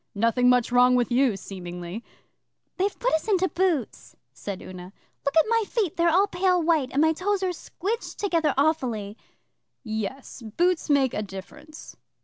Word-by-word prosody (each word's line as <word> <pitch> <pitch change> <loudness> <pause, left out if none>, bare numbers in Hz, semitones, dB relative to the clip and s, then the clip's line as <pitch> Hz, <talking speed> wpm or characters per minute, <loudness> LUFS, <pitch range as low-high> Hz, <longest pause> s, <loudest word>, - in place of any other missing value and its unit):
'Nothing 230 +4 +3
much 250 -1 +3
wrong 250 0 +5
with 245 -1 +1
you, 245 -4 +2
seemingly.' 180 +2 -7 0.7
'They've 390 +1 -1
put - - 0
us 315 +5 0
into 380 -3 +2
boots,' 320 - -2 0.2
said 185 - -6
Una. 180 0 -10 0.3
'Look 280 +3 -1
at 320 - +6
my 455 0 +2
feet 410 -9 -1
they're 340 0 +3
all 370 +5 +4
pale 365 -2 +1
white, 315 -5 +1
and 285 +3 +2
my 320 0 +4
toes 390 +3 -1
are 365 -1 0
squidged 410 +6 -5
together 335 -7 0
awfully.' 250 -9 0 0.7
'Yes 220 +4 -5
boots 330 +11 0
make 275 -3 +3
a - - -2
difference. 250 +11 -10
280 Hz, 160 wpm, -25 LUFS, 220-355 Hz, 0.7 s, at